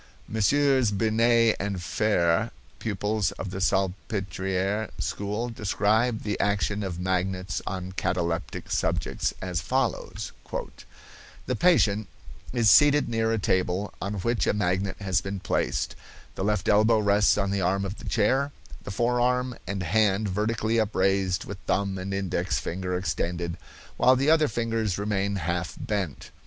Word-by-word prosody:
Messieurs 130 Hz, +3 st, +3 dB
Binet 115 Hz, +2 st, +3 dB
and 100 Hz, -2 st, -2 dB
Fere, 90 Hz, +2 st, +1 dB, 0.3 s
pupils 105 Hz, -1 st, -1 dB
of 95 Hz, -, -6 dB
the 95 Hz, -, -4 dB
Salpetriere 95 Hz, +1 st, -1 dB
school, 105 Hz, +4 st, -2 dB
describe 110 Hz, +2 st, +1 dB
the 105 Hz, -1 st, -2 dB
action 105 Hz, 0 st, 0 dB
of 90 Hz, -3 st, -4 dB
magnets 95 Hz, 0 st, -1 dB
on 95 Hz, -1 st, -4 dB
cataleptic 85 Hz, -2 st, -2 dB
subjects, -, -, 0 dB
as 90 Hz, -2 st, -2 dB
follows: 130 Hz, -5 st, -2 dB, 1.1 s
"The -, -, -1 dB
patient 110 Hz, -, +3 dB, 0.4 s
is 120 Hz, -3 st, +2 dB
seated 145 Hz, +3 st, +6 dB
near 115 Hz, -1 st, +1 dB
a 115 Hz, -, +1 dB
table, 95 Hz, 0 st, 0 dB
on 100 Hz, +2 st, -2 dB
which 115 Hz, +4 st, 0 dB
a -, -, +3 dB
magnet 95 Hz, -1 st, 0 dB
has 95 Hz, -3 st, 0 dB
been 95 Hz, +1 st, -4 dB
placed, 90 Hz, -, -1 dB, 0.4 s
the -, -, -4 dB
left 105 Hz, -1 st, 0 dB
elbow 110 Hz, +2 st, +5 dB
rests 105 Hz, 0 st, +3 dB
on 100 Hz, -1 st, 0 dB
the 100 Hz, -1 st, 0 dB
arm 95 Hz, +2 st, +1 dB
of 100 Hz, +2 st, -5 dB
the -, -, -6 dB
chair, 130 Hz, +6 st, +2 dB, 0.3 s
the -, -, -7 dB
forearm 125 Hz, +3 st, +1 dB
and 100 Hz, -2 st, -2 dB
hand 105 Hz, +2 st, +2 dB
vertically 110 Hz, +3 st, 0 dB
upraised 95 Hz, -2 st, +1 dB
with 100 Hz, 0 st, -7 dB
thumb 100 Hz, -1 st, 0 dB
and 95 Hz, +1 st, -5 dB
index 95 Hz, -2 st, -1 dB
finger 90 Hz, +1 st, -3 dB
extended, 85 Hz, -2 st, -2 dB, 0.4 s
while 130 Hz, -, +5 dB
the 135 Hz, +4 st, +3 dB
other 155 Hz, -2 st, +4 dB
fingers 115 Hz, -4 st, -1 dB
remain 100 Hz, -1 st, -1 dB
half 90 Hz, 0 st, -2 dB
bent. 95 Hz, -9 st, -3 dB
100 Hz, 140 wpm, -26 LUFS, 95-110 Hz, 1.1 s, seated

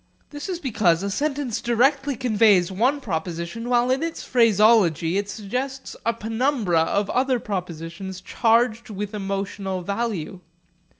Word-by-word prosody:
This 290 Hz, +5 st, -6 dB
is 365 Hz, -, -2 dB
because 200 Hz, -, +1 dB
a 200 Hz, -, -2 dB
sentence 280 Hz, -1 st, -2 dB
directly 270 Hz, +4 st, +2 dB
conveys 215 Hz, -7 st, +3 dB
one 255 Hz, +9 st, +1 dB
proposition, 170 Hz, +4 st, -4 dB
while 245 Hz, 0 st, +3 dB
in 260 Hz, -, +1 dB
its 330 Hz, 0 st, -4 dB
phraseology 210 Hz, -, +3 dB
it 205 Hz, 0 st, -4 dB
suggests 250 Hz, +6 st, -4 dB
a 230 Hz, -, +2 dB
penumbra 225 Hz, -, 0 dB
of 200 Hz, +5 st, 0 dB
other 255 Hz, 0 st, +1 dB
propositions 180 Hz, -1 st, -5 dB
charged 230 Hz, +2 st, +1 dB
with 205 Hz, 0 st, -5 dB
emotional 195 Hz, -2 st, -3 dB
value. 200 Hz, -3 st, -3 dB
220 Hz, 130 wpm, -23 LUFS, 190-250 Hz, -, conveys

